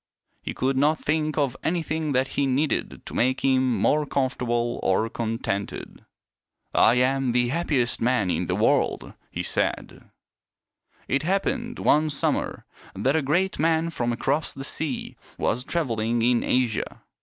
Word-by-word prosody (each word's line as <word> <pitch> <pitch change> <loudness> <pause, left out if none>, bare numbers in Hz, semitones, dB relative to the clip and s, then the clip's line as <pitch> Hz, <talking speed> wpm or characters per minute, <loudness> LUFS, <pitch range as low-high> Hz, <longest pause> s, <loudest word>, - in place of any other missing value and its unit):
He - - -5
could 130 +1 0
not 150 +3 +3
think 155 0 -1
of 140 -4 +1
anything 160 -3 -1
that 130 +1 +1
he 140 - 0
needed 140 +4 -1
to - - -8
make 130 +2 +1
him 130 -2 +2
more 150 0 +2
comfortable 120 -3 -1
or 95 +4 +2
contented. 110 -3 -4 0.4
" - - -52
I 115 - +5
am 130 0 +2
the 120 0 +2
happiest 140 -5 0
man 115 -6 +2
in - - -1
the - - 0
world," - - +1 0.2
he - - -4
said. - - -2 1.0
It 140 - +1
happened 235 +7 -1
one 155 +1 +3
summer 145 - -1 0.3
that 130 +9 +1
a 160 - +3
great 175 +8 0
man 165 +1 +2
from 120 -6 -1
across 140 +6 -1
the 135 - -6
sea 145 -1 -4 0.2
was 125 +2 0
traveling 120 -7 0
in 120 0 +3
Asia. 125 -3 -1
135 Hz, 150 wpm, -25 LUFS, 120-155 Hz, 1.0 s, I